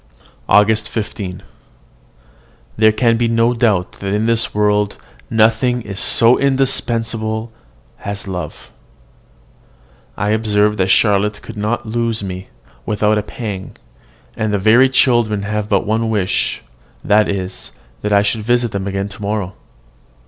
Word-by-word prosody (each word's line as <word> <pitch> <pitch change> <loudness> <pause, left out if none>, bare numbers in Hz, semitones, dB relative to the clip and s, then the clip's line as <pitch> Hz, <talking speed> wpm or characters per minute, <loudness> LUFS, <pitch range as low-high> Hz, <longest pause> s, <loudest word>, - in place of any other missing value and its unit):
AUGUST 110 +1 +4
15. 100 -4 -5 1.3
There 110 0 +5
can 115 +1 +2
be 120 0 +1
no 115 +1 +2
doubt 110 -7 0
that 100 0 -2
in 105 +1 0
this 115 0 +1
world 105 -1 +1 0.3
nothing 115 +2 +2
is 100 -2 -6
so 115 +2 +4
indispensable 115 -5 -1 0.5
as 100 0 -4
love. 90 -2 -6 1.5
I 105 - -1
observe 105 -1 +2
that 95 - +1
Charlotte 105 +1 +2
could 115 - -9
not 105 +4 -2
lose 115 -1 -2
me 95 -1 -6 0.4
without 105 0 +1
a - - -1
pang, 105 -3 -7 0.6
and 110 -1 -1
the 105 - +1
very 115 +7 +5
children 120 -6 +2
have 105 0 -3
but 100 -2 +1
one 110 +2 0
wish; 100 -4 -1 0.4
that 105 +1 +3
is, 95 -2 -4 0.3
that 105 - -2
I 100 0 +4
should 105 +2 -1
visit 120 +1 +1
them 100 0 -3
again 100 0 -2
to 100 - -12
morrow. 100 -2 -2
105 Hz, 135 wpm, -17 LUFS, 100-115 Hz, 1.5 s, There